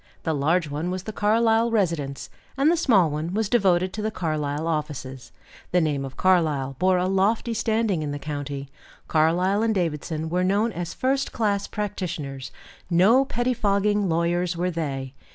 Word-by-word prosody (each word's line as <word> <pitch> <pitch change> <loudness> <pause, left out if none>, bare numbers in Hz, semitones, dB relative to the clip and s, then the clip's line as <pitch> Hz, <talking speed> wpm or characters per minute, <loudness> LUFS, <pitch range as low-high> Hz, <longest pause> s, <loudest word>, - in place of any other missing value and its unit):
The 160 - 0
large 155 +4 +1
one 150 +4 -3
was 185 0 -3
the 215 - -6
Carlyle 225 +2 +2
residence, 165 -11 -1 0.3
and 285 +4 +4
the - - +3
small 205 - +3
one 155 +5 -3
was 220 -1 +1
devoted 190 -5 +2
to 215 - -4
the 215 - -1
Carlyle 155 -5 -2
offices. 145 -5 -4 0.4
The 180 - +3
name 150 -4 0
of 135 - -9
Carlyle 155 -8 +2
bore 185 +1 +3
a 180 - +1
lofty 200 +5 +1
standing 220 -5 0
in 150 - -3
the 145 - -3
county; 145 -2 -5 0.4
Carlyle 175 +6 +2
and 225 -1 +1
Davidson 160 -2 -2
were 180 +2 0
known 205 +5 +2
as 175 -3 -5
first 270 +1 0
class 205 -3 0
practitioners; 170 -10 -4 0.4
no 205 +10 +5
pettifogging 210 -5 +1
lawyers 170 +1 0
were 180 +1 0
they. 135 -5 -4
180 Hz, 165 wpm, -24 LUFS, 155-210 Hz, 0.4 s, no